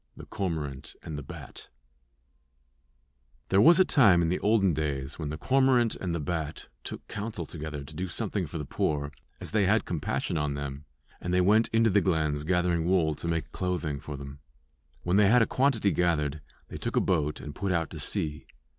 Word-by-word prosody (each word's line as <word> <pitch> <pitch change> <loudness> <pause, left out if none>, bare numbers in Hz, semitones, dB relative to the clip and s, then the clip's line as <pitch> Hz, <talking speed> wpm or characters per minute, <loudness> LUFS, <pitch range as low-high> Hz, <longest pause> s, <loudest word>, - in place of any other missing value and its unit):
THE - - -9
CORMORANT 75 -8 -4
AND 80 - -6
THE 75 - -4
BAT 65 - -10 1.8
There 95 +1 +5
was 170 +3 +7
a 185 - +6
time 95 - +5
in 80 - +1
the 90 - 0
olden 105 -4 +3
days 70 -2 -3
when 75 -3 -3
the 75 - -4
cormorant 130 - +3
and 90 -3 -3
the - - -2
bat 80 0 -4
took - - -7
counsel 100 -5 -5
together 75 -2 -6
to 70 - -11
do 90 +1 -3
something 100 -1 -2
for 80 - -6
the 75 - -4
poor, 70 +1 -1 0.3
as - - -6
they 105 -2 +2
had 110 +1 +3
compassion 80 0 -2
on 75 -1 -1
them, 70 0 -6 0.4
and 90 - -3
they 90 - +3
went 105 +5 +4
into 115 -1 +3
the 100 +1 +4
glens 75 -5 0
gathering 90 -1 +1
wool 85 -4 +2
to 80 - -6
make 80 -2 -2
clothing 85 -6 -2
for 75 -2 -7
them. 70 0 -9 0.6
When 90 +2 +2
they 105 -1 +6
had 120 +1 +6
a - - +2
quantity 125 -7 +2
gathered 75 -5 0 0.3
they - - -7
took - - -4
a - - +5
boat 75 -4 0
and 75 - -7
put 100 +3 -2
out 85 -2 0
to - - -7
sea. 75 -1 -3
85 Hz, 200 wpm, -28 LUFS, 75-100 Hz, 1.8 s, was